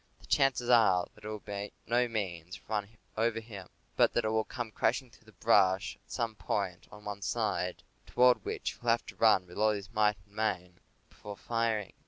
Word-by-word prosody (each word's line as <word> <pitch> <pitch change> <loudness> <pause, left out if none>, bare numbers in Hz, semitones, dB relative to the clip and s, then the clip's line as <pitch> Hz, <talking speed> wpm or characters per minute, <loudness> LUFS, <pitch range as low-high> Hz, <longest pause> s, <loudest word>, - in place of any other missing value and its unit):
The - - -17
chances 135 -3 +2
are 110 -7 +5
that 105 - -19
it - - -6
will 110 0 -4
by 100 0 -5 0.2
no 120 +2 +2
means 90 -6 -4
run 105 -2 -2 0.3
over 115 +1 +1
him, 105 -5 -10 0.3
but - - +4
that 120 - +1
it - - +1
will 110 0 +1
come 120 0 -5
crashing 125 +3 0
through 110 - -22
the - - -15
brush 95 -3 +3
at - - -35
some 115 -1 -1
point 100 -4 -3
on 105 0 -13
one 100 -1 -5
side, 90 -2 -1 0.2
toward 125 -4 +4
which - - -3
he - - -16
will 120 - -1
have 115 +1 +2
to - - -10
run 110 -5 +5
with 90 +2 -10
all 110 0 +4
his 100 +2 -7
might 105 -1 +3
and 100 - -25
main 90 -5 -2 0.3
before 105 -1 -9
firing. 115 -3 -1
105 Hz, 210 wpm, -31 LUFS, 100-115 Hz, 0.3 s, are